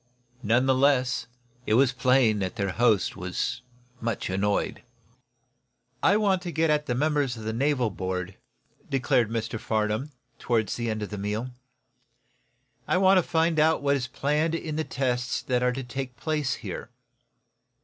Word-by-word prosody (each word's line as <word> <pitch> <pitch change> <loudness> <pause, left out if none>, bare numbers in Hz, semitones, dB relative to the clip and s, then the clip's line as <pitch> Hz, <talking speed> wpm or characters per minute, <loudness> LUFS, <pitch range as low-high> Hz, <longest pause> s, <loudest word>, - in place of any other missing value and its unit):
None 120 +4 +2
the 135 - +4
less, 130 -2 +2 0.4
it 110 - +3
was 130 +1 +5
plain 125 -4 +3
that 95 +3 -3
their 100 -3 -1
host 110 -2 +2
was 90 0 -3 0.4
much 115 -5 -2
annoyed. 100 +2 0 1.2
"I 200 - +4
want 195 -4 +2
to 175 -1 -5
get 160 -1 +2
at 150 0 +1
the 125 - 0
members 145 -3 +1
of 110 - -8
the 110 +1 -3
naval 130 -2 +1
board," 90 0 -4 0.5
declared 130 -3 +2
Mr. 115 0 -3
Farnum, 110 +5 -1 0.3
toward 115 -3 0
the 120 -1 -2
end 110 -1 -2
of 105 - -6
the 105 - -5
meal. 105 +5 -3 1.4
"I - - +2
want 190 0 +5
to - - +3
find 165 -1 +1
out 160 -1 +3
what 140 0 +3
is 125 -3 -2
planned 150 +5 0
in 155 -2 -4
the 160 - 0
tests 125 -3 -1
that 125 -1 0
are 125 0 +2
to 135 +1 -4
take 130 0 -5
place 150 -6 -1
here." 100 +2 -7
125 Hz, 165 wpm, -26 LUFS, 110-145 Hz, 1.4 s, was